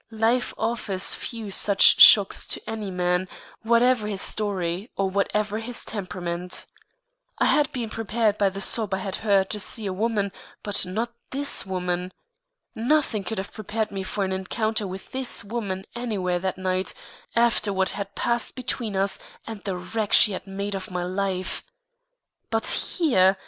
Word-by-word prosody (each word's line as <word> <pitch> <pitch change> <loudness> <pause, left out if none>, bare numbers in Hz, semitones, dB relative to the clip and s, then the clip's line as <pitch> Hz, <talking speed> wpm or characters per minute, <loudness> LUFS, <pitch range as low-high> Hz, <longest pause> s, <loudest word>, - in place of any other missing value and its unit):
Life 235 +3 +2
offers 215 -4 0
few 225 -4 -5
such 200 +1 +5
shocks 200 -3 +8
to - - -2
any 220 -2 -4
man, 180 0 0 0.3
whatever 235 0 +3
his 200 -3 -1
story 195 -1 -2
or 195 - +1
whatever 210 +2 0
his 235 +1 -4
temperament. 180 -3 -4 0.7
I - - +2
had 295 -2 +3
been 235 -4 -4
prepared 220 -1 0
by 200 -1 +4
the 195 +1 -7
sob 205 -1 +1
I - - -2
had 190 0 -4
heard 200 -3 +2
to 210 - -1
see 215 +2 +1
a 190 - -2
woman, 205 0 0 0.3
but 205 -2 +1
not 225 +6 -3 0.2
this 280 -5 +1
woman. 180 -1 -2 0.6
Nothing 240 -3 +1
could 215 +4 -4
have 190 +1 -5
prepared 215 0 -3
me 195 -1 -4
for 195 +2 -2
an 190 - -2
encounter 210 +3 -1
with 190 +1 -8
this 260 -1 +1
woman 200 -3 -4
anywhere 200 -7 -1
that 185 0 -2
night, 185 0 -1 0.4
after 230 -3 +3
what 190 -1 +1
had 200 0 -4
passed 235 -1 0
between 250 -4 -3
us 195 +1 +2 0.3
and 220 -3 -8
the 190 -3 -2
wreck 205 +4 -3
she 210 - +6
had 190 - -6
made 200 +1 -4
of 190 -1 -5
my 180 -1 -3
life. 185 0 -2 0.9
But 225 0 0 0.3
here! 195 - +4
200 Hz, 165 wpm, -25 LUFS, 190-225 Hz, 0.9 s, shocks